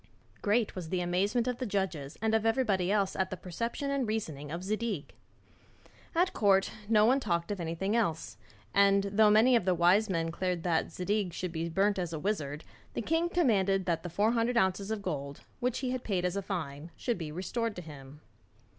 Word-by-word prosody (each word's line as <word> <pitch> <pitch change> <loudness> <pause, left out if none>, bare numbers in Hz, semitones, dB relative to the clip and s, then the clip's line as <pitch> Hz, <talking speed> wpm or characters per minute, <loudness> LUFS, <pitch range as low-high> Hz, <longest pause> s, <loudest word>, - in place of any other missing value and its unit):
Great 215 +1 +1
was 175 -4 -6
the 185 - 0
amazement 195 +7 +1
of 250 -1 -2
the 255 - -2
judges 185 -8 -2
and 220 0 +2
of 220 -1 +3
everybody 215 -6 +1
else 200 -2 +1
at 190 -1 0
the 185 - -5
perception 230 - -3
and 275 -4 0
reasoning 155 -10 -3
of 170 +2 -4
Zadig. 210 -5 -3 1.0
At 355 +2 +2
court, 195 -2 +3 0.2
no 215 -2 +5
one 260 +4 +4
talked 170 -6 -1
of 200 - -3
anything 170 +5 -2
else; 170 -9 -1 0.4
and 200 0 +5
though 210 +2 +4
many 225 +4 +6
of 230 - +3
the 185 0 +2
wise 185 +6 +4
men 165 -3 0
declared 175 +1 -2
that 165 -2 0
Zadig 190 +1 -1
should 180 0 -4
be 165 0 -3
burnt 195 +3 +2
as 175 -2 -3
a 160 - -3
wizard, 150 -6 -2 0.3
the - - -2
king 325 +6 +1
commanded 195 - +2
that 170 -3 0
the 175 - -6
four 205 +6 +2
hundred 235 +1 +1
ounces 195 -1 +1
of 220 -2 -3
gold, 140 -6 -4 0.2
which 250 -1 0
he 250 - 0
had 255 -1 -3
paid 185 -4 -1
as 180 +1 -1
a 200 - -1
fine, 160 -5 -5
should 240 -6 -2
be 155 -3 -5
restored 205 +7 -2
to 180 - -7
him. 145 -1 -11
195 Hz, 205 wpm, -30 LUFS, 170-220 Hz, 1.0 s, many